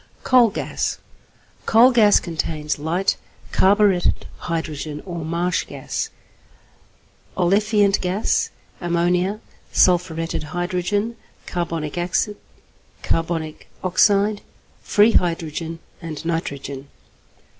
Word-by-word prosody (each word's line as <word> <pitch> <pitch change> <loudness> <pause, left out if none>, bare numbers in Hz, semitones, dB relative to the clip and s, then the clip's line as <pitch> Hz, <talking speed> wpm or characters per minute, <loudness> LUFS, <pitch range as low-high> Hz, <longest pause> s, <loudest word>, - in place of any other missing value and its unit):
=Coal 250 -3 +5
Gas.= 205 - -3 0.7
Coal 235 +4 +7
gas 215 -4 +6
contains 155 -3 -3
light 170 +6 0 0.3
carburetted 195 -2 +3 0.2
hydrogen 155 -2 -3
or 170 -3 -5
marsh 170 +3 0
gas, - - -4 1.3
olefiant 200 +2 +3
gas, 185 +4 0 0.3
ammonia, 180 +4 0 0.3
sulphuretted 175 -2 +2 0.2
hydrogen, 195 +5 -1 0.3
carbonic 165 -3 -3
acid, 190 +4 0 0.7
carbonic 165 -2 -2 0.2
oxide, 200 +3 +3 0.4
free 210 +2 +4
hydrogen, 165 -3 -1 0.2
and 165 -2 -7
nitrogen. 140 -4 -4
175 Hz, 80 wpm, -22 LUFS, 165-205 Hz, 1.3 s, Coal